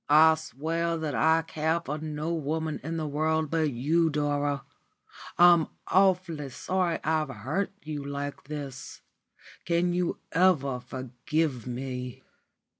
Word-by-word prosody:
"I 160 Hz, +2 st, +8 dB
swear 160 Hz, +2 st, -2 dB
that 155 Hz, -2 st, -3 dB
I 160 Hz, +1 st, +3 dB
care 160 Hz, +1 st, 0 dB
for 155 Hz, -2 st, -4 dB
no 155 Hz, +1 st, -3 dB
woman 160 Hz, 0 st, -2 dB
in 165 Hz, +2 st, -4 dB
the 160 Hz, -, -2 dB
world 155 Hz, +1 st, 0 dB
but 160 Hz, -2 st, +2 dB
you, 160 Hz, +7 st, +2 dB
Dora. 145 Hz, -2 st, 0 dB, 0.7 s
I'm 175 Hz, -2 st, +7 dB, 0.2 s
awfully 180 Hz, -6 st, +2 dB
sorry 175 Hz, +6 st, -1 dB
I've 155 Hz, -1 st, +1 dB
hurt 135 Hz, -, -2 dB
you 150 Hz, -2 st, -4 dB
like 140 Hz, 0 st, -5 dB
this. 140 Hz, -3 st, -7 dB, 0.6 s
Can 175 Hz, +1 st, +1 dB
you 180 Hz, -1 st, 0 dB
ever 150 Hz, -8 st, +3 dB
forgive 130 Hz, +2 st, -2 dB
me?" 125 Hz, 0 st, -5 dB
155 Hz, 125 wpm, -28 LUFS, 140-165 Hz, 0.7 s, I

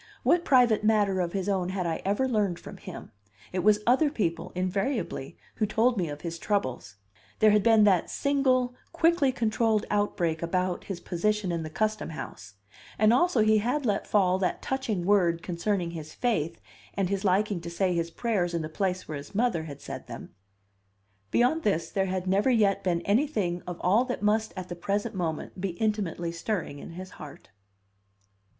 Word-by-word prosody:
What 345 Hz, 0 st, +3 dB
private 245 Hz, -7 st, +4 dB
matter 205 Hz, -3 st, +3 dB
of 175 Hz, -1 st, -1 dB
his 195 Hz, -1 st, -2 dB
own 190 Hz, -3 st, 0 dB
had 185 Hz, -1 st, -2 dB
I 165 Hz, -1 st, -2 dB
ever 205 Hz, +7 st, +1 dB
learned 205 Hz, -7 st, 0 dB
from -, -, -10 dB
him? -, -, -9 dB, 0.4 s
It 185 Hz, -, 0 dB
was 210 Hz, +3 st, +3 dB
other 265 Hz, +6 st, +4 dB
people, 180 Hz, -, -2 dB
invariably, 185 Hz, -, -2 dB, 0.2 s
who 215 Hz, -, +1 dB
told 230 Hz, +4 st, +2 dB
me 175 Hz, -6 st, -1 dB
of 145 Hz, 0 st, -7 dB
his 170 Hz, -1 st, -5 dB
troubles. 130 Hz, -, -2 dB, 0.4 s
There 215 Hz, -1 st, +5 dB
had 210 Hz, 0 st, +4 dB
been 225 Hz, 0 st, +5 dB
that 190 Hz, -5 st, +3 dB
single, 260 Hz, -3 st, +1 dB, 0.2 s
quickly 330 Hz, -4 st, +3 dB
controlled 225 Hz, -3 st, +1 dB
outbreak 180 Hz, -6 st, 0 dB
about 180 Hz, +1 st, -1 dB
his 195 Hz, -3 st, -5 dB
position 195 Hz, +2 st, -1 dB
in 170 Hz, -1 st, -2 dB
the 155 Hz, -, -5 dB
Custom 215 Hz, +5 st, -1 dB
House, 105 Hz, -10 st, -8 dB, 0.4 s
and 215 Hz, +2 st, +5 dB
also 265 Hz, -2 st, +3 dB
he 215 Hz, 0 st, +4 dB
had 250 Hz, +6 st, -1 dB
let 205 Hz, -3 st, 0 dB
fall 190 Hz, -3 st, +3 dB
that 185 Hz, -, 0 dB
touching 225 Hz, -9 st, -2 dB
word 175 Hz, -4 st, +3 dB
concerning 175 Hz, 0 st, -1 dB
his 155 Hz, -2 st, -8 dB
faith 170 Hz, -10 st, -1 dB, 0.4 s
and 195 Hz, -2 st, +1 dB
his 200 Hz, 0 st, -1 dB
liking 195 Hz, -1 st, +1 dB
to 170 Hz, -, -6 dB
say 180 Hz, +2 st, 0 dB
his 170 Hz, -1 st, -1 dB
prayers 180 Hz, -3 st, -1 dB
in 165 Hz, -, -1 dB
the 155 Hz, -, -5 dB
place 185 Hz, +2 st, -2 dB
where 150 Hz, -2 st, -4 dB
his 145 Hz, +7 st, -12 dB
mother 215 Hz, -8 st, +1 dB
had 140 Hz, -2 st, -9 dB
said -, -, -7 dB
them; -, -, -9 dB, 1.0 s
beyond 255 Hz, +7 st, +2 dB
this, 195 Hz, -, 0 dB
there 195 Hz, -1 st, 0 dB
had 185 Hz, -1 st, -2 dB
never 195 Hz, +6 st, +2 dB
yet 205 Hz, -5 st, +3 dB
been 175 Hz, -2 st, +1 dB
anything 200 Hz, -, 0 dB
of 175 Hz, -1 st, -5 dB
all 205 Hz, +7 st, +4 dB
that 250 Hz, -5 st, -4 dB
must 215 Hz, +1 st, +2 dB
at 185 Hz, -1 st, -5 dB
the 175 Hz, -, -6 dB
present 205 Hz, +6 st, -2 dB
moment 175 Hz, 0 st, -4 dB
be 190 Hz, -2 st, -2 dB
intimately 200 Hz, -6 st, -1 dB
stirring 170 Hz, -4 st, -3 dB
in -, -, -9 dB
his 185 Hz, +2 st, -8 dB
heart. 150 Hz, -2 st, -11 dB
195 Hz, 185 wpm, -27 LUFS, 175-220 Hz, 1.0 s, There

